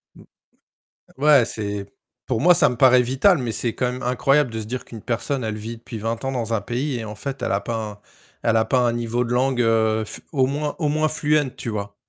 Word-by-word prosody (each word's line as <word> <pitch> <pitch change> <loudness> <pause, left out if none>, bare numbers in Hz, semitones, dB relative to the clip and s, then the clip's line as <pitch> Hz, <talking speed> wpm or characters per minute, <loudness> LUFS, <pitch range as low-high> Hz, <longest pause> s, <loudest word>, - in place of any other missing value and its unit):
Mmh. - - -15 1.0
Ouais, 145 -4 +6
c'est 100 -3 -4 0.4
pour 115 -2 -1
moi 180 +1 +6
ça - - +5
me 125 - -3
paraît 125 0 +6
vital, 135 +8 +3
mais 120 -3 -3
c'est 115 0 -2
quand 125 -1 0
même 125 - -7
incroyable 130 +2 +2
de 110 0 -4
se - - -5
dire 125 +2 -5
qu'une 115 -3 -10
personne 125 +1 -2
elle 110 -1 -3
vit 115 +2 -6
depuis 115 -1 -8
20 115 +3 -3
ans 135 - -1
dans 115 -3 -2
un 105 - 0
pays 125 +2 -2
et 110 - -5
en 105 0 -7
fait, 135 +5 -6
elle - - 0
a 100 - +1
pas 115 -1 -3 0.2
un 100 - -15 0.4
elle 115 -1 +2
a 110 - +3
pas 130 - +2
un 120 -1 +2
niveau 120 +1 -1
de 120 - -5
langue, 130 0 +1
heu, 110 -1 +2
f - - -6
au 130 -3 +3
moins 145 +2 -2
au 150 -3 0
moins 155 +1 +1
fluent 150 -3 +1
tu - - -5
vois? 100 -2 -4
120 Hz, 250 wpm, -22 LUFS, 115-135 Hz, 1.0 s, Ouais